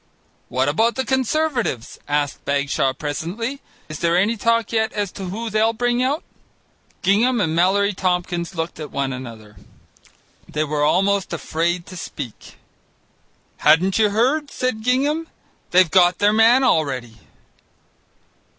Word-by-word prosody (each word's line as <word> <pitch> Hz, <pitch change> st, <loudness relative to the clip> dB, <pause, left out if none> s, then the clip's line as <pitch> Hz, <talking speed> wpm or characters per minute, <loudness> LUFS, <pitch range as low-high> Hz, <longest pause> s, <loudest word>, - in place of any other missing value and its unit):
"What 130 Hz, +2 st, 0 dB
about 225 Hz, +11 st, +2 dB
the 265 Hz, -, -2 dB
Conservatives?" 260 Hz, -, -1 dB
asked 145 Hz, -1 st, -1 dB
Bagshaw 140 Hz, -1 st, 0 dB
presently; 180 Hz, -, -4 dB, 0.3 s
"is 155 Hz, -1 st, -7 dB
there 170 Hz, +1 st, +2 dB
any 205 Hz, +5 st, +2 dB
talk 230 Hz, 0 st, +1 dB
yet 220 Hz, -1 st, +1 dB
as 205 Hz, -3 st, -2 dB
to 195 Hz, -, -7 dB
who 220 Hz, +5 st, -5 dB
they'll 220 Hz, +1 st, +2 dB
bring 245 Hz, +1 st, 0 dB
out?" 275 Hz, +5 st, 0 dB, 0.8 s
Gingham 230 Hz, +6 st, +3 dB
and 165 Hz, -6 st, 0 dB
Mallory 200 Hz, +4 st, +2 dB
Tompkins 180 Hz, -1 st, -2 dB
looked 165 Hz, 0 st, -4 dB
at 150 Hz, -2 st, -6 dB
one 135 Hz, -1 st, -2 dB
another. 115 Hz, -5 st, -10 dB, 0.9 s
They 150 Hz, -, -1 dB
were 150 Hz, -1 st, -1 dB
almost 195 Hz, +4 st, +1 dB
afraid 170 Hz, +1 st, -1 dB
to 185 Hz, -, -11 dB
speak. 140 Hz, -8 st, -8 dB, 1.0 s
"Hadn't 175 Hz, +7 st, +3 dB
you 215 Hz, -1 st, +4 dB
heard?" 265 Hz, +8 st, +1 dB
said 255 Hz, -5 st, -2 dB
Gingham; 285 Hz, +7 st, 0 dB, 0.4 s
"they've 180 Hz, -3 st, +4 dB
got 175 Hz, +1 st, +4 dB
their 205 Hz, +1 st, +3 dB
man 230 Hz, +4 st, +5 dB
already." 130 Hz, -, 0 dB
190 Hz, 135 wpm, -21 LUFS, 155-230 Hz, 1.0 s, man